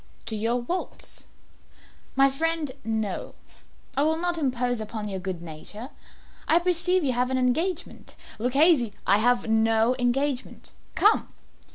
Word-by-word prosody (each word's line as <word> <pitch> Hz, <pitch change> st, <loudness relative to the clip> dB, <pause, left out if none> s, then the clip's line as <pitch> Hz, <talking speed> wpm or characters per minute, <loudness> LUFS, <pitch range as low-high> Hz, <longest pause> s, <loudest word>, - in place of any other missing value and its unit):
"To 220 Hz, -, -3 dB
your 235 Hz, +3 st, 0 dB
vaults." 355 Hz, +9 st, -4 dB, 0.9 s
"My 270 Hz, 0 st, +5 dB
friend, 320 Hz, 0 st, -1 dB
no; 220 Hz, -3 st, -3 dB, 0.6 s
I 275 Hz, -, +1 dB
will 315 Hz, +2 st, +2 dB
not 350 Hz, 0 st, -1 dB
impose 250 Hz, -4 st, 0 dB
upon 215 Hz, 0 st, -5 dB
your 195 Hz, -2 st, -3 dB
good 180 Hz, -2 st, -5 dB
nature. 190 Hz, -, -9 dB, 0.6 s
I 325 Hz, -, +5 dB
perceive 360 Hz, +1 st, +2 dB
you 265 Hz, -3 st, +1 dB
have 250 Hz, +1 st, 0 dB
an 260 Hz, -, 0 dB
engagement. 315 Hz, +8 st, -1 dB, 0.2 s
Luchesi 250 Hz, -, +4 dB
" -, -, -32 dB
"I -, -, +3 dB
have 245 Hz, +1 st, +2 dB
no 225 Hz, +2 st, +3 dB
engagement; 260 Hz, +2 st, -1 dB, 0.2 s
come." 425 Hz, +2 st, +3 dB
250 Hz, 140 wpm, -26 LUFS, 225-315 Hz, 0.9 s, My